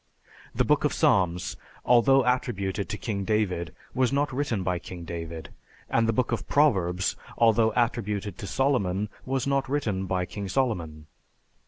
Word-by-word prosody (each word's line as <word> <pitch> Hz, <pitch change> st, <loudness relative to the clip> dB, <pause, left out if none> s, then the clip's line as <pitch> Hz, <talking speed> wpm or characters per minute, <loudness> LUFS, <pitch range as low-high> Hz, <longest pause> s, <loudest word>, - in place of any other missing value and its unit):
The -, -, +2 dB
Book -, -, +3 dB
of -, -, +1 dB
Psalms, 90 Hz, -2 st, +1 dB, 0.3 s
although 125 Hz, +2 st, +5 dB
attributed 100 Hz, -6 st, -1 dB
to 105 Hz, -, -3 dB
King 100 Hz, -4 st, -3 dB
David, 95 Hz, -6 st, 0 dB, 0.2 s
was 130 Hz, -1 st, +2 dB
not 145 Hz, 0 st, 0 dB
written 125 Hz, -8 st, -1 dB
by 90 Hz, -1 st, -1 dB
King 85 Hz, -1 st, -9 dB
David; 85 Hz, -1 st, -6 dB, 0.4 s
and 115 Hz, -1 st, +3 dB
the -, -, +3 dB
Book 120 Hz, +2 st, 0 dB
of 120 Hz, -, -2 dB
Proverbs, 95 Hz, -, +2 dB, 0.2 s
although 115 Hz, -1 st, +4 dB
attributed 105 Hz, -4 st, -1 dB
to 100 Hz, -, -5 dB
Solomon, 105 Hz, -8 st, 0 dB, 0.2 s
was 130 Hz, -1 st, 0 dB
not 140 Hz, -1 st, 0 dB
written 105 Hz, -10 st, -1 dB
by 90 Hz, -1 st, 0 dB
King 100 Hz, +2 st, -6 dB
Solomon. 90 Hz, -, -1 dB
105 Hz, 155 wpm, -27 LUFS, 90-125 Hz, 0.4 s, although